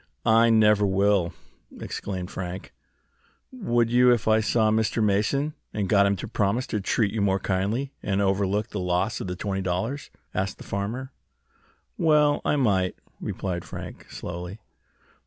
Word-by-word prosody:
"I 115 0 +5
never 105 -2 +5
will!" 100 -2 +2 0.5
exclaimed 95 -2 -5
Frank. 90 0 -6 0.8
"Would 120 - 0
you 125 +1 +6
if 120 -3 +1
I 110 0 +5
saw 110 0 +2
Mr. 110 +1 +1
Mason 110 +9 +1 0.2
and 105 -2 -1
got 100 0 +4
him 100 - +2
to 95 - -6
promise 110 +3 0
to 105 - 0
treat 100 +1 +1
you 110 - -1
more 95 -1 +2
kindly, 100 +9 -1
and 100 -1 -1
overlook 100 +1 +1
the 105 - -4
loss 90 +5 0
of - - -4
the 90 - -3
twenty 95 +1 -2
dollars?" 105 +10 -2 0.2
asked 95 0 -2
the - - -10
farmer. 115 +7 -4 0.9
"Well, 150 -2 +4
I - - +1
might," 100 -9 +1 0.2
replied 90 -3 -3
Frank, - - -9
slowly. 90 +3 -6
105 Hz, 155 wpm, -25 LUFS, 95-115 Hz, 0.9 s, you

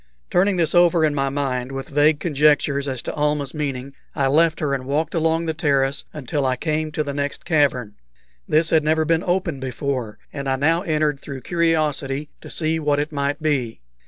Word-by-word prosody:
Turning 190 +2 +3
this 165 -3 +1
over 175 -2 +5
in 150 - +1
my 135 -1 0
mind, 135 -2 -2
with 135 0 -6
vague 150 +1 +3
conjectures 145 -2 +2
as 130 -3 -4
to - - -4
Almah's 150 -2 -1
meaning, 140 -3 -4 0.2
I 140 - +1
left 160 +3 +3
her 145 -2 0
and 130 -1 -3
walked 150 +3 -1
along 165 0 +1
the 160 - -1
terrace 140 -3 0
until 145 0 -3
I 130 -1 +1
came 155 +3 -2
to 155 - 0
the 140 -1 -4
next 145 0 -3
cavern. 135 -9 +1 0.5
This 155 +1 +2
had 160 -2 +4
never 155 +1 +2
been 165 +2 +1
open 175 -5 -1
before, 130 -3 -3 0.2
and 140 -1 -3
I 135 - +2
now 160 +5 +2
entered 155 -5 0
through 135 -2 -8
curiosity 150 -3 0
to - - -10
see 160 0 -1
what 145 -2 +1
it 150 +1 -2
might 145 +1 -2
be. 135 -7 0
150 Hz, 195 wpm, -22 LUFS, 140-160 Hz, 0.5 s, over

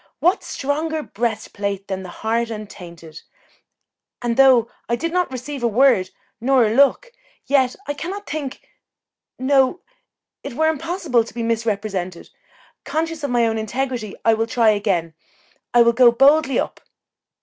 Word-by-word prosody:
What 355 +3 +2
stronger 310 +3 -2
breast 220 -2 -3
plate 200 -1 -3
than 190 -1 -4
a 185 - -8
heart 230 +4 -2
untainted? 175 -7 -9 1.0
and 240 -1 -1
though 260 -3 +5 0.2
I 235 - +2
did 330 +7 -3
not 360 -5 0
receive 260 +2 -6
a 240 - +2
word 230 -5 +3 0.3
nor 260 -1 +4
a 215 - 0
look, 280 - +3 0.3
yet 265 -3 +2
I 290 - -2
cannot 380 +8 -6
think 285 -4 -6 0.7
no, 270 +5 +2 0.6
it - - -6
were 315 +3 +2
impossible 320 -5 0
to 225 - -12
be 235 - -3
misrepresented. 205 -6 -3 0.5
Conscious 315 +2 -3
of 285 - -1
my 240 -1 +2
own 225 -1 0
integrity, 235 -1 -3
I 225 - +5
will 225 +1 0
try 230 -1 +3
again 190 -6 -1 0.6
I 240 -1 +6
will 235 0 +3
go 240 0 +6
boldly 275 +3 +4
up." - - -3
240 Hz, 150 wpm, -21 LUFS, 220-285 Hz, 1.0 s, I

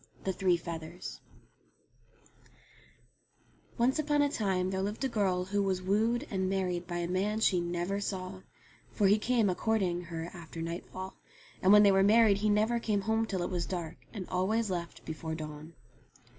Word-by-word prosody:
THE 190 - -1
THREE 185 -2 +2
FEATHERS 170 0 -7 2.6
ONCE 255 +5 +2
upon 295 -1 +2
a 285 - +2
time 190 -5 0
there 190 0 -1
lived 205 +6 -3
a - - +3
girl 190 -6 0
who 200 +2 0
was 190 -2 0
wooed 225 +7 +1
and 190 -2 0
married 180 -2 -1
by 175 -1 -3
a 170 0 -1
man 200 +4 0
she 185 -5 +3
never 175 +3 -2
saw; 185 -2 -4 0.5
for 205 - +1
he 205 +2 +5
came 230 -1 +2
a 185 - +2
courting 180 -4 0
her 165 0 -5
after 170 -2 -9
nightfall, 175 +3 -6 0.4
and 190 - +5
when 210 0 +9
they 200 - +6
were 195 0 +4
married 210 0 +5
he 215 +1 +1
never 215 +3 +2
came 210 -3 0
home 220 +2 0
till 190 -4 -2
it - - -3
was 175 -2 -2
dark, 170 -3 -4
and 195 -5 -6
always 200 +4 0
left 170 -2 -5
before 160 0 -4
dawn. 155 +1 -8
190 Hz, 175 wpm, -31 LUFS, 175-210 Hz, 2.6 s, when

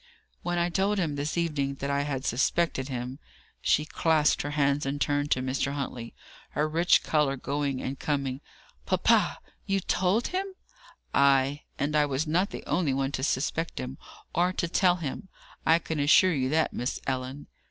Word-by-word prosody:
"When 175 0 -2
I 175 0 +1
told 195 +4 +1
him 165 -6 0
this 145 +3 -3
evening 145 -5 0
that 140 +1 -3
I 140 0 +1
had 140 -2 -3
suspected 130 +2 +1
him 125 +1 -5 0.2
" - - -30
She 150 - +2
clasped 155 -1 +2
her 145 - -3
hands 145 0 +1
and 140 +1 -2
turned 145 0 0
to 130 - +1
Mr. 135 +2 -1
Huntley, 125 -4 -5 0.4
her 150 - +2
rich 165 +3 +3
colour 150 -3 +1
going 140 0 -2
and 135 +1 -4
coming. 140 -2 -2 0.5
"Papa, - - +3 0.3
you 195 0 +2
told 190 +5 +1
him?" 380 +1 -3 0.6
"Ay. 140 +1 +3
And 145 +2 -1
I 150 -1 +4
was 140 +2 -1
not 175 +6 +1
the - - -7
only 150 -7 +1
one 135 0 0
to 130 - -3
suspect 155 +4 -1
him, 130 +1 -6 0.3
or 180 +2 +2
to 170 - -1
tell 180 +1 +3
him. 175 +4 -5 0.4
I 160 - +6
can 160 -2 -4
assure 160 +6 +5
you 130 -3 0
that, 155 +2 +1
Miss 125 +2 -2
Ellen." 130 +2 -3
145 Hz, 180 wpm, -28 LUFS, 135-170 Hz, 0.6 s, I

